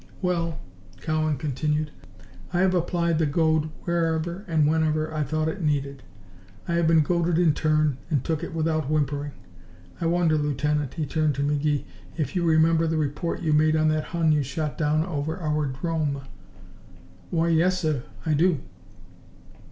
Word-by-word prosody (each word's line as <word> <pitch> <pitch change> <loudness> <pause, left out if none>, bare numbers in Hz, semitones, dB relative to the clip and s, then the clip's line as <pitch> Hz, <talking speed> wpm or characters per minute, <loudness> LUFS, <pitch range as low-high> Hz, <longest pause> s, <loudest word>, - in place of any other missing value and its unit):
"Well," 170 -3 -1 0.4
Cowan 155 -2 0
continued, 150 +2 -1 0.6
"I 175 - +2
have 190 -1 +3
applied 170 -2 +1
the 160 - +2
goad 155 +1 +2
whenever 170 +1 -1
and 160 -3 +2
wherever 155 0 +1
I 155 - -1
thought 155 +2 -1
it 170 +4 -3
needed. 140 -3 -1 0.7
I 170 - -1
have 170 -1 +2
been 165 -1 +5
goaded 170 +1 +1
in 170 -3 +4
turn, 155 -3 +1
and 145 -5 +1
took 160 0 -2
it 170 - -6
without 155 -3 0
whimpering. 145 -1 0 0.7
I 165 - +1
wonder, 165 -2 +2
Lieutenant," 150 -1 -1
he 160 -3 -1
turned 155 -1 0
to 140 - -1
McGee, 145 0 0 0.3
"if 150 -2 -2
you 180 - +1
remember 165 0 +4
the 160 0 0
report 155 +4 -2
you 155 -2 +2
made 155 +1 +4
on 155 0 +3
that 155 0 0
Hun 165 -2 +1
you 150 -1 +3
shot 145 +3 -3
down 155 +1 +1
over 160 -1 -3
our 150 -4 -1
'drome?" 145 0 -2 1.1
"Why 170 0 +1
yes, 175 +3 +3
sir, 155 -7 0 0.2
I 160 - +1
do." 165 +2 +3
155 Hz, 165 wpm, -25 LUFS, 150-165 Hz, 1.1 s, been